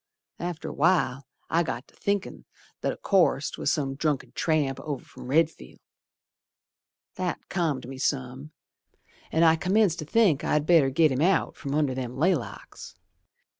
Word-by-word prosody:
After 175 -2 -4
a - - -6
while 145 -5 +1 0.2
I 165 - +2
got 130 -5 -4
to - - -24
thinkin' 200 -1 -3 0.4
that - - 0
o' - - -8
course 175 -7 +2
'Twas - - -1
some 135 -3 -1
drunken 145 0 -2
tramp 150 -5 0
over 145 -4 -5
from - - -12
Redfield. 155 - 0 1.4
That 185 -1 -4
calmed 155 -9 -1
me 135 0 -8
some, 135 +1 -2 0.8
An' 160 - +3
I 160 -1 +6
commenced 185 0 +2
to 155 - -5
think 180 -4 +3
I'd 150 -1 +1
better 160 -5 +5
git 155 +2 +3
him 130 +2 -1
out 185 +4 +2
From 140 -1 -4
under 150 -3 +1
them 125 -1 -5
laylocks. 160 -3 -2
155 Hz, 155 wpm, -26 LUFS, 135-170 Hz, 1.4 s, I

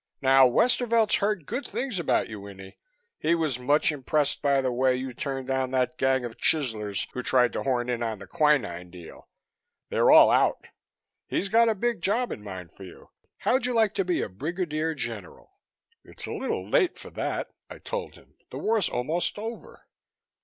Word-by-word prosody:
Now 135 0 +6
Westervelt's 230 - +3
heard 200 -5 -1
good 245 - -4
things 250 -8 -3
about 170 - +1
you, 105 -2 -8
Winnie. 95 -1 -12 0.4
He 165 +2 +2
was 155 -7 -1
much 145 +5 +2
impressed 145 0 -1
by 140 -2 +2
the 130 -1 0
way 130 +1 +2
you 130 0 -5
turned 135 +1 -4
down 130 0 -1
that 130 +4 -1
gang 130 -1 +2
of 115 - -8
chiselers 110 -10 0
who 125 - -3
tried 125 -1 +2
to - - -2
horn 125 -2 -1
in 120 -1 -2
on 115 -2 -2
the - - -11
quinine 140 - +1
deal. 85 -2 -13 0.6
They're - - +2
all - - +8
out. - - +2 0.6
He's 195 - -1
got 230 +2 +4
a 220 - +1
big 235 -1 -1
job 230 +7 0
in 105 - -6
mind 95 -4 -8
for - - -19
you. 90 - -13 0.3
How'd 255 -1 +1
you 250 - -2
like 220 -2 +3
to 195 - 0
be 180 -1 0
a - - -3
Brigadier 155 - -3
General?" 475 - -7 0.5
"It's - - -7
a - - -6
little - - -3
late 365 - +2
for - - -11
that," - - -3 0.2
I - - -9
told - - -6
him. - - -20 0.2
"The - - -7
war's 220 -5 +1
almost 155 +12 -1
over." 225 +2 -8
140 Hz, 190 wpm, -26 LUFS, 125-200 Hz, 0.6 s, all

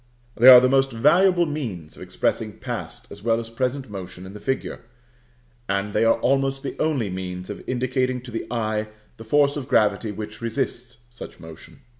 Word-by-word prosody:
They 120 +2 +4
are 125 -1 +12
the 130 - +3
most 135 +1 +2
valuable 175 +9 +4
means 115 - -5
of - - -14
expressing - - -2
past - - -7
as 100 - -10
well 115 +1 +1
as 115 -1 -7
present 130 +3 -2
motion 95 -3 -8
in 95 - -10
the 105 - -9
figure, 130 +6 -3 0.9
and 100 +1 -1
they 110 - +2
are 115 0 +4
almost 135 +1 +1
the 140 - -5
only 135 -11 0
means 90 0 -5
of 105 - -8
indicating 130 0 -1
to 125 0 -11
the 115 - -5
eye 110 -2 -2 0.3
the 115 - -10
force 140 +5 +2
of 135 -3 -5
gravity 105 -2 +2
which 105 +2 -8
resists 120 0 -4
such 120 - -11
motion. 80 -1 -13
120 Hz, 185 wpm, -23 LUFS, 105-135 Hz, 0.9 s, are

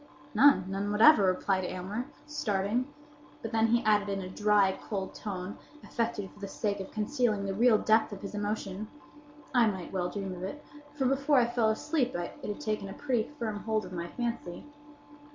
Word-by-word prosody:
"None! 280 -8 +6
none 195 +2 -2
whatever!" 215 +1 +7
replied 185 +1 +1
Aylmer, 195 +8 -4 0.2
starting; 235 -1 -1 0.5
but 225 - -4
then 225 -1 +3
he 235 +2 +2
added, 210 -2 +3
in 195 0 -1
a 185 - -6
dry, 205 0 +3
cold 195 -3 -4
tone, 190 -1 -6 0.2
affected 225 -4 -2
for - - -18
the 200 - -5
sake 200 0 -2
of 190 - -6
concealing 215 -2 0
the 195 - -2
real 230 +2 +5
depth 220 +1 +3
of 200 -1 -8
his 200 - -6
emotion, 205 -1 -3 0.7
"I 240 -3 +5
might 190 -4 -4
well 180 -2 0
dream 195 -1 -4
of 180 - -8
it; 285 +11 -6 0.3
for 270 -3 0
before 275 +2 +3
I 245 - +5
fell 235 -2 +1
asleep 255 - 0
it 175 0 -3
had 205 - -4
taken 215 -2 -2
a - - -6
pretty 250 -5 -1
firm 220 -4 -3
hold 220 0 -1
of - - -9
my 170 -1 -4
fancy." 230 -5 -4
210 Hz, 190 wpm, -30 LUFS, 195-235 Hz, 0.7 s, whatever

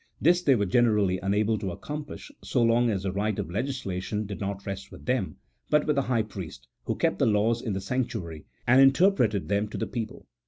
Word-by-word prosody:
This 175 +3 +4
they 140 -6 +4
were 105 -3 +1
generally 105 -3 +2
unable 105 +2 +1
to 95 - -3
accomplish, 150 - -7
so 125 - +1
long 115 +1 +3
as 95 -4 -1
the 95 - -1
right 105 +2 -1
of - - -4
legislation 105 -4 -3
did 100 0 -6
not 100 -1 -4
rest 100 0 -6
with - - -12
them, 125 -6 -1 0.3
but 150 -1 +3
with 150 - +1
the 140 - +3
high 115 -3 +2
priest, 95 -6 -9 0.2
who - - -1
kept - - 0
the - - +3
laws 110 +2 +2
in 110 - -3
the 95 - -3
sanctuary, 95 - -3 0.2
and 130 +2 +6
inter 140 +9 +6
preted 110 - 0
them 100 +1 0
to 105 - -7
the - - -1
people. 115 -3 -6
110 Hz, 220 wpm, -27 LUFS, 100-125 Hz, 0.3 s, and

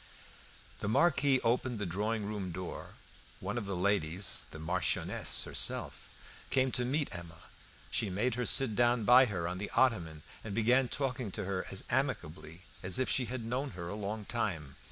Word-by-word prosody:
The - - -3
Marquis 140 +2 +3
opened 120 +1 0
the 105 - -3
drawing 105 +4 -2
room 100 -3 -4
door; 90 +1 -7 0.4
one - - -4
of 115 -5 -3
the 100 - -3
ladies 90 -1 +1
(the - - -9
Marchioness 85 +3 +1
herself) - - -1 0.3
came 130 -1 +2
to 125 - 0
meet 140 +4 -1
Emma. 85 -2 -9 0.5
She 110 - +1
made 105 +7 0
her 125 +1 -1
sit 135 -6 +6
down 120 0 +3
by 125 +4 +7
her 90 -8 -3
on 90 +2 -4
an 105 - -4
ottoman, 85 - +1 0.2
and 105 -2 -5
began 125 +4 +3
talking 125 -4 -2
to 105 - -3
her 95 -1 -3
as 95 - -4
amicably 95 - -2 0.2
as 95 -1 +2
if 130 - 0
she 130 - +2
had 120 -1 -5
known 130 +3 -3
her 85 -1 -5
a - - -4
long 105 +1 -4
time. 80 - -3
105 Hz, 175 wpm, -32 LUFS, 90-125 Hz, 0.5 s, by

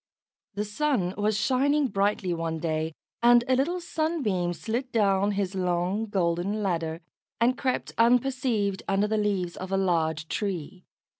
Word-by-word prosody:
The 205 +1 -1
sun 210 -5 0
was 210 0 0
shining 275 +6 +2
brightly 195 -3 0
one 165 -1 -2
day, 160 -1 -2 0.3
and 240 0 +6
a 260 - +3
little 330 +8 0
Sunbeam 310 - -1
slid 235 +8 -3
down 200 -2 +2
his 195 -1 -1
long 185 +3 0
golden 190 +2 0
ladder, 165 -3 -2 0.4
and 240 +2 +3
crept 260 -1 -2
unperceived 235 -4 +2
under 195 +1 +2
the 220 +1 0
leaves 195 -4 -1
of 185 +1 -7
a 195 - +2
large 160 -4 0
tree. 185 -2 -4
200 Hz, 145 wpm, -27 LUFS, 180-240 Hz, 0.4 s, and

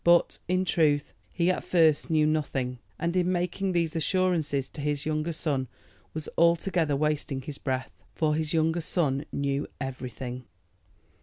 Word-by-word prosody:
But, 170 0 +4
in 185 +1 +1
truth, 150 -5 +2 0.2
he 175 +1 +2
at - - -2
first 160 -4 +3
knew 155 -2 +4
nothing, 135 -5 -1 0.2
and 170 +1 -1
in 180 0 +2
making 180 +2 0
these 170 -2 0
assurances 165 -6 +1
to 150 - -8
his 145 -1 -1
younger 155 +1 0
son 145 -5 -1 0.5
was 155 -1 -4
altogether 170 -2 +3
wasting 145 -2 -1
his 140 +1 -7
breath, 130 -1 -2 0.2
for 155 -2 +2
his 155 0 -1
younger 160 +1 +2
son 150 -4 0
knew 140 0 -1
everything. 125 -1 -5
155 Hz, 150 wpm, -28 LUFS, 140-170 Hz, 0.5 s, But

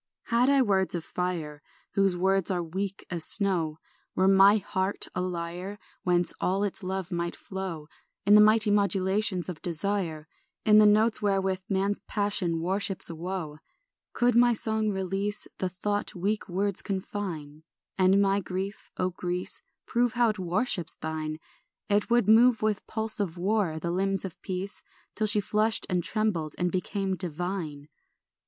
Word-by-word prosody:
STR. - - -21
4 235 - +4
Had 250 +2 +4
I 280 -1 +5
words 190 -5 +1
of 170 - -4
fire, 165 -5 -3 0.3
Whose 195 -2 +2
words 190 0 +1
are 180 -2 0
weak 190 +4 -4
as 170 -3 -2
snow; 175 -7 +2 0.4
Were 190 - +3
my 195 +2 +7
heart 190 -1 -2
a 180 - -2
lyre 180 +2 -4 0.2
Whence 175 -1 +1
all 195 +2 +1
its 205 +1 -2
love 190 -1 -4
might 170 0 -2
flow 190 -5 -6 0.4
In 205 - +5
the 210 - +9
mighty 215 0 +5
modulations 195 -1 +1
of 175 -4 -6
desire, 170 -2 -2 0.4
In 215 -1 +7
the 210 - +7
notes 215 +2 +3
wherewith 195 -2 0
man's 195 +1 0
passion 195 -5 0
worships 190 +1 -1
woe; 165 -2 -5 0.5
Could 245 0 +2
my 240 +1 +5
song 220 -1 +1
release 195 +1 -2
The 185 - -1
thought 205 +3 -3
weak 205 +3 -2
words 195 +2 -1
confine, 180 -6 -5 0.3
And 190 0 +4
my 200 0 +3
grief, 190 +2 -5
O 185 0 0
Greece, 180 0 -4 0.2
Prove 240 0 +1
how 240 -1 +3
it 215 -2 -3
worships 185 0 0
thine; 155 -1 -4 0.5
It 205 +2 +1
would 240 -3 +3
move 225 +1 +5
with 215 -2 -1
pulse 220 -1 0
of 180 -4 -2
war 190 -3 0
the 170 +1 -3
limbs 195 +2 0
of 185 -1 -8
peace, 190 +1 -5 0.3
Till 215 - 0
she 210 0 +5
flushed 215 +2 +1
and 180 -1 +1
trembled 190 -9 -1
and 180 0 0
became 190 +1 -2
divine. 175 -4 -4
190 Hz, 160 wpm, -27 LUFS, 175-205 Hz, 0.5 s, the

